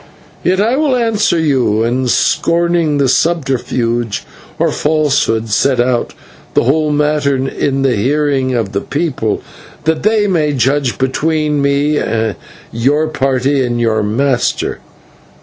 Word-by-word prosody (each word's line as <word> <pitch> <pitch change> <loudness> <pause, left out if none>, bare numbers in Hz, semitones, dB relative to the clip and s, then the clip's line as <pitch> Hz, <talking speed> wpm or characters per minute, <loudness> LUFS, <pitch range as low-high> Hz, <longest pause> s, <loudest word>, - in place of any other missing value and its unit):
Yet 185 +2 +1
I 230 +6 +2
will 295 -3 +2
answer 225 -7 +1
you, 130 -9 +1
and, 125 +2 0
scorning 170 -2 +1
subterfuge 125 -7 0 0.3
or - - +1
falsehood, 145 -7 0
set 130 +4 +1
out 120 0 0 0.4
the - - +3
whole 150 +5 +1
matter 150 -1 +1
in 135 +1 -1
the 135 -2 +2
hearing 135 +2 0
of 110 -5 -1
the 100 -1 -2
people, 145 -9 -2 0.4
that 160 0 0
they 215 0 +2
may 160 -7 +1
judge 135 0 0
between 150 +2 0
me, 140 +2 +1 0.7
your 145 +7 +1
party, 135 -1 0
and 120 -1 -2
your 110 -2 +1
master. 125 +5 0
140 Hz, 125 wpm, -14 LUFS, 125-155 Hz, 0.7 s, the